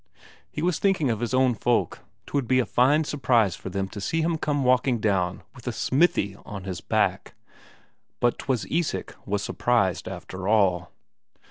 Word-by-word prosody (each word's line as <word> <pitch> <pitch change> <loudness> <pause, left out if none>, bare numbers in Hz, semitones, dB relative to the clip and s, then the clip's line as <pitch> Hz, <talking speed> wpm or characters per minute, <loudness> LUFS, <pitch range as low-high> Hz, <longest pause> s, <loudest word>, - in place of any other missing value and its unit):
He 150 - -5
was 180 -1 +1
thinking 185 -10 +2
of 110 - -2
his 120 0 -2
own 130 -1 +3
folk; 120 +2 0 0.3
'twould 140 -4 -2
be 130 - +3
a 130 - +2
fine 140 +6 +3
surprise 120 - +2
for - - -8
them 95 -1 -2
to 100 - -7
see 165 +11 0
him 165 0 +1
come 145 -3 0
walking 125 -1 +2
down 95 -4 0
with 125 -1 -14
a - - +1
smithy 120 - +1
on 95 -3 -8
his 90 -3 -5
back. - - 0 0.8
But 120 0 +1
'twas 130 -4 -1
Isak 165 0 -2
was 100 0 -1
surprised 110 -8 0
after 95 0 -6
all. 95 -5 +2
120 Hz, 170 wpm, -25 LUFS, 100-140 Hz, 0.8 s, own